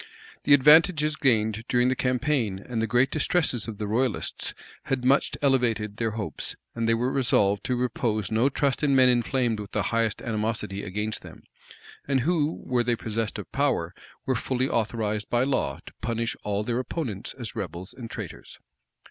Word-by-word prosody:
The 145 - +8
advantages 150 +2 +5
gained 110 -5 +1
during 125 0 +3
the 130 - +1
campaign 125 -5 0
and 115 +3 -4
the 115 - 0
great 125 +4 +3
distresses 155 - +1
of 110 -2 -6
the 105 - -3
royalists, 115 +3 -1 0.3
had 130 -2 -1
much 135 +2 +3
elevated 115 -6 +1
their 115 -1 0
hopes; 105 - -3 0.2
and 115 -1 -1
they 115 - +4
were 125 +3 0
resolved 105 -7 +2
to 125 - 0
repose 110 -4 -1
no 115 +5 +3
trust 140 0 0
in 140 -2 +3
men 130 -1 +6
inflamed 120 -2 +1
with 105 -1 -8
the - - +1
highest 115 -2 0
animosity 105 -3 -2
against 105 +2 -3
them, - - -13 0.6
and 135 -2 +2
who, 160 +1 0
were 125 -2 +1
they 120 0 +1
possessed 110 -1 -3
of - - -8
power, 135 -12 0 0.3
were 130 - +1
fully 130 +2 0
authorized 110 -3 -1
by 120 +1 +2
law 130 - 0
to - - -11
punish 115 0 -1
all 105 0 -1
their 120 +2 -1
opponents 125 - -4
as 120 -5 -6
rebels 90 -3 -6
and 120 -3 -8
traitors. - - -8
120 Hz, 175 wpm, -26 LUFS, 110-130 Hz, 0.6 s, The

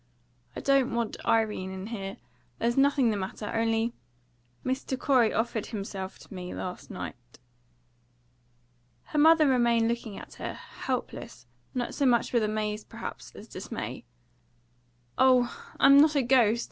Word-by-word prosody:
"I - - -5
don't 275 -3 +2
want 235 -2 -2
Irene 215 -4 +1
in 190 0 -6
here. 200 -3 -5 0.4
There's 235 +1 0
nothing 275 -3 +4
the 210 - -1
matter. 195 +2 -5
Only, 225 +1 +1 0.7
Mr. 260 0 -2
Corey 255 -5 +3
offered 225 -1 -1
himself 195 -3 -5
to - - -14
me 180 -1 -6
last 180 -1 -6
night." 120 - -8 1.7
Her 300 - -2
mother 315 0 +6
remained 235 -3 +3
looking 230 -3 -3
at - - -10
her, - - -4
helpless, - - -5 0.3
not 245 -1 -2
so 280 - +1
much 240 0 +2
with 235 - +4
amaze, 215 0 -1
perhaps, - - -8
as - - -11
dismay. - - -6 1.2
"Oh, 255 - +4 0.2
I'm 275 +1 +8
not 305 +1 +5
a 280 - +3
ghost! 235 -3 +4
230 Hz, 140 wpm, -28 LUFS, 210-260 Hz, 1.7 s, I'm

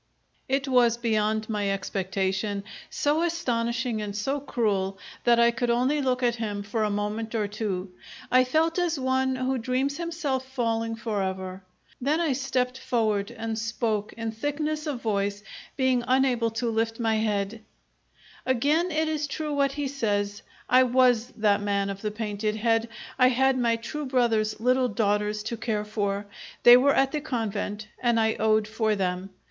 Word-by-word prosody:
It 275 +1 0
was 245 -3 +4
beyond 220 -2 0
my 210 -2 -1
expectation, 195 +1 -2 0.3
so 295 +2 +1
astonishing 235 -8 -1
and 205 -1 -5
so 270 +8 -1
cruel 200 -8 -1 0.3
that 235 -1 +5
I 235 0 +5
could 235 +1 -2
only 255 +5 +2
look 255 -1 0
at 240 -1 +2
him 205 -3 -3
for 215 +2 -1
a 210 - +1
moment 210 +2 -3
or 215 -2 0
two. 200 -3 -3 0.4
I 255 +1 +6
felt 320 +6 +1
as 340 -4 0
one 260 0 +1
who 255 0 -1
dreams 260 +4 -1
himself 325 -6 -2
falling 230 -3 -1
forever. 190 -4 -3 0.4
Then 295 +5 +1
I 325 -5 +1
stepped 260 -1 -1
forward 215 -6 0
and 225 -1 -4
spoke, 225 -2 -1
in 225 -1 -4
thickness 300 +6 -2
of 270 -5 -4
voice, 205 -1 -1 0.3
being 260 -2 +2
unable 255 -3 +2
to 230 +1 -2
lift 225 +1 -1
my 225 -1 +1
head: 215 0 -1 0.8
"Again 290 +8 +2
it 315 -1 0
is 305 -1 -1
true 300 +1 -3
what 280 -1 +1
he 290 -1 -2
says. 205 -6 -1 0.3
I 255 +2 +6
was 250 -2 +3
that 205 -2 +3
man 200 -1 0
of 195 0 -8
the 215 - -1
painted 210 0 -2
head. 225 +1 +1 0.3
I 255 - +7
had 265 +1 +3
my 235 -2 +2
true 300 +6 -5
brother's 225 -5 +1
little 255 +2 +3
daughters 210 0 0
to 230 +2 -4
care 215 -2 -2
for. 205 -1 -2 0.4
They 240 - +10
were 275 +3 +4
at 270 0 +3
the 300 - -2
convent, 220 -6 -3 0.2
and 235 -2 +2
I 220 0 +2
owed 215 -1 +3
for 220 0 0
them. 185 -1 -2
230 Hz, 165 wpm, -26 LUFS, 210-260 Hz, 0.8 s, They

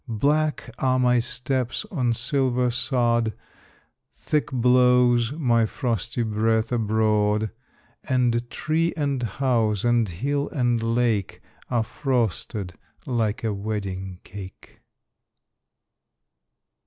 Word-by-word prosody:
Black 145 +4 0
are 130 -1 +2
my 125 -1 +3
steps 125 - -2
on 125 - +1
silver 125 0 0
sod; 120 -3 +1 0.8
Thick 150 -1 -1
blows 125 -1 +4
my 120 -7 +2
frosty 115 0 -2
breath 110 +1 0
abroad; 110 -2 +1 0.5
And 120 -2 +1
tree 165 +2 0
and 140 -4 -1
house, 115 -3 0
and 120 -3 +2
hill 140 - -2
and 120 -4 0
lake, 115 -3 0 0.3
Are 120 -3 +1
frosted 110 - -2 0.3
like 115 -1 -1
a 110 -2 0
wedding 100 -3 -4
cake. 95 -1 -11
120 Hz, 95 wpm, -24 LUFS, 110-130 Hz, 0.8 s, blows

